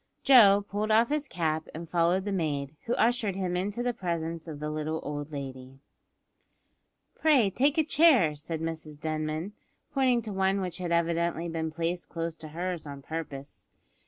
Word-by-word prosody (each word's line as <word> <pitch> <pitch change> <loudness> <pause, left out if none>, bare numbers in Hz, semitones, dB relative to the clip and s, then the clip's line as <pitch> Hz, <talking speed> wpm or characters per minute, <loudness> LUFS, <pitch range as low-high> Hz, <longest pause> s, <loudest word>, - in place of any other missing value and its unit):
Joe 205 -7 +7
pulled 210 +2 -2
off 225 +2 +4
his 300 0 -1
cap 160 -2 -1
and 165 +1 -6
followed 175 +3 +2
the 205 - -2
maid, 150 -5 -2
who 235 - +1
ushered 225 -4 +1
him 185 -2 -2
into 205 +6 -2
the 245 0 0
presence 170 -5 -3
of 150 -3 -7
the 150 0 -3
little 155 +1 -2
old 145 +1 -5
lady. 135 -2 -7 1.4
"Pray 270 -11 +3
take 280 - +2
a 315 - +5
chair," 285 - +5
said 155 +2 -5
Mrs 160 -2 -5
Denman, 155 +4 -3 0.4
pointing 255 -4 +2
to 210 -2 -5
one 190 +1 +1
which 185 -1 -4
had 175 -2 -3
evidently 170 0 +1
been 165 -1 -2
placed 170 +2 -3
close 165 -1 -3
to 155 - -9
hers 170 0 -4
on 140 -1 -8
purpose. 150 -4 -7
170 Hz, 170 wpm, -28 LUFS, 155-205 Hz, 1.4 s, Joe